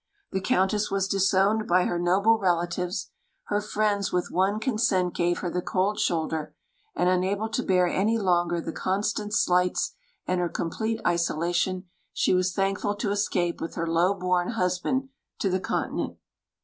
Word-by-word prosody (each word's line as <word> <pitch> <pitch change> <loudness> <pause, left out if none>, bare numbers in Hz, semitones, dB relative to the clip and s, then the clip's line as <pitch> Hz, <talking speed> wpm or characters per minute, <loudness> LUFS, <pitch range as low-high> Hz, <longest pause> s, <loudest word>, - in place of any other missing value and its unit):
The 190 - -1
Countess 195 +3 +1
was 195 -1 0
disowned 195 +2 +2
by 180 +1 +4
her 175 - -1
noble 200 +6 +3
relatives; 175 0 -1 0.4
her 205 0 +1
friends 210 -1 0
with 180 0 -1
one 195 +3 +1
consent 215 -6 +1
gave 175 0 +1
her 175 - -2
the 180 - -1
cold 195 +3 0
shoulder; 160 -2 -1 0.4
and, 175 - +1
unable 190 +4 +1
to 225 - -1
bear 185 -5 +3
any 210 +6 +1
longer 175 -4 +1
the 165 - -4
constant 205 +2 -1
slights 180 -3 +2 0.3
and 180 0 0
her 175 -1 0
complete 220 +8 -2
isolation, 175 +2 0 0.3
she - - +2
was 185 0 +2
thankful 195 +2 0
to 205 0 -2
escape 180 -4 0
with 165 - -5
her 165 - -1
low 170 +4 +2
born 180 +2 0
husband 225 +7 0 0.3
to 195 - 0
the 185 - +1
Continent. - - -2
185 Hz, 160 wpm, -26 LUFS, 175-205 Hz, 0.4 s, by